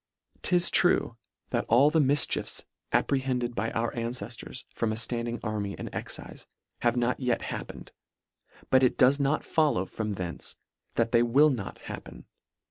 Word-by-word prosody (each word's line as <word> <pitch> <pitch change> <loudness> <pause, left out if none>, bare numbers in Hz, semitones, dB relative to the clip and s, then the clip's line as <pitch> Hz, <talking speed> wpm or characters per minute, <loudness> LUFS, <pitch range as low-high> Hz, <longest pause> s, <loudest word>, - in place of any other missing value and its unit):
'Tis 175 -1 +2
true 175 -8 +3 0.4
that - - +1
all 135 +6 +5
the 160 - +3
mifchiefs 145 0 +2 0.3
apprehended 130 -3 0
by 115 0 -1
our 115 +1 -1
anceftors 120 +1 -5
from 115 -2 -1
a - - -2
ftand 115 +1 +1
ing 120 0 -3
army 105 -3 -3
and - - -6
excife, - - -6 0.3
have 120 0 +1
not 120 +1 +1
yet 125 -3 0
happen - - -6
ed: - - -14 0.8
but 130 - +6
it 130 - +2
does 135 +3 +5
not 140 +2 0
follow 145 - +2
from 105 +1 -4
thence, 90 -2 -3 0.4
that 115 0 +1
they 115 - +5
will 135 +6 +5
not 115 -7 -5
happen. - - -9
120 Hz, 160 wpm, -28 LUFS, 115-135 Hz, 0.8 s, but